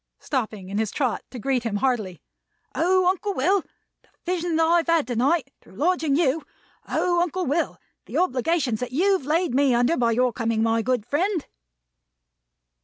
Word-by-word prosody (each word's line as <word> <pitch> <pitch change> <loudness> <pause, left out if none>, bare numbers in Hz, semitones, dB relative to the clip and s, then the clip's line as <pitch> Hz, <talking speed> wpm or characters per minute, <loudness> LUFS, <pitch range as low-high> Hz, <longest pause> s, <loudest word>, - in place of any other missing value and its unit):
Stopping 215 -8 -4
in 200 +2 -2
his 220 -2 0
trot 255 -1 -1
to 255 - -9
greet 255 +1 0
him 230 -3 -3
heartily. 210 -7 -1 0.5
"O, 370 +2 +2
Uncle 380 +2 0
Will, 370 +9 +2 0.4
the - - -31 0.2
vision 350 -1 -1
that 325 - +3
I've 335 +1 +2
had 335 -3 +3
to 245 - -4
night, 275 +4 +1
through - - -18
lodging 315 - +1
you! 315 -1 +1 0.5
O, 350 -1 +1
Uncle 360 +1 -1
Will, 300 +5 -1 0.3
the - - -4
obligations 270 -6 +1
that 250 0 -5
you've 370 -1 +2
laid 330 -1 +1
me 270 -2 +3
under 245 +7 +2
by 235 -4 +2
your 250 +1 +2
coming, 230 -1 0
my 225 0 +2
good 245 -2 -1
friend!" 350 - 0
275 Hz, 175 wpm, -24 LUFS, 240-345 Hz, 0.5 s, that